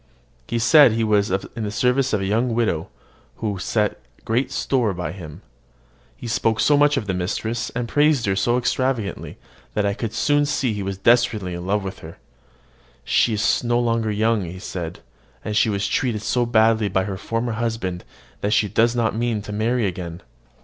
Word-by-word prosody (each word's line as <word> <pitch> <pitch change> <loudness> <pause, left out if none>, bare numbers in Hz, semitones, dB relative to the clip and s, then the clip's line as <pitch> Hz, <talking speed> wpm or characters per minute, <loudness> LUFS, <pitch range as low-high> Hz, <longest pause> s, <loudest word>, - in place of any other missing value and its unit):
He 120 - -2
said 125 +2 +6
he 115 0 0
was 105 -1 +2
in 95 +4 -3
the 105 - -2
service 125 +5 +1
of 105 - 0
a - - -1
young 115 +4 0
widow, 105 -9 0 0.5
who 105 -4 -3
set 105 +2 -1 0.2
great 120 +4 0
store 120 -8 0
by 90 0 -4
him. 85 -6 -10 0.7
He - - -10
spoke 115 -1 0
so 145 +7 +4
much 145 0 +4
of 115 - -2
his 95 -2 -2
mistress, 110 +6 -2
and 120 -1 -2
praised 145 -1 +2
her 95 -1 +1
so 120 +5 +1
extravagantly, 125 -4 -2 0.4
that 105 - +1
I 100 - +1
could 110 +1 -4
soon 145 +3 +2
see 130 -5 0
he 105 - -4
was 95 0 -4
desperately 110 -4 +2
in 85 +1 -6
love 105 +1 0
with 95 -1 -6
her. 80 +1 -11 0.9
"She 115 - +2
is 105 +3 +1
no 120 0 +1
longer 115 -2 0
young," 110 0 +1
he 90 +1 -7
said: 90 -2 -6 0.4
"and 105 - -3
she 110 - +3
was 100 -1 -1
treated 110 -1 -1
so 120 +1 +1
badly 110 -2 +3
by 95 0 +1
her 95 0 -4
former 115 +4 -2
husband 110 -6 -3 0.4
that 105 +1 0
she 105 - +3
does 115 +4 +2
not 115 -2 +1
mean 115 -2 -1
to 105 - -7
marry 115 +2 0
again." 90 -2 -5
110 Hz, 190 wpm, -22 LUFS, 100-120 Hz, 0.9 s, said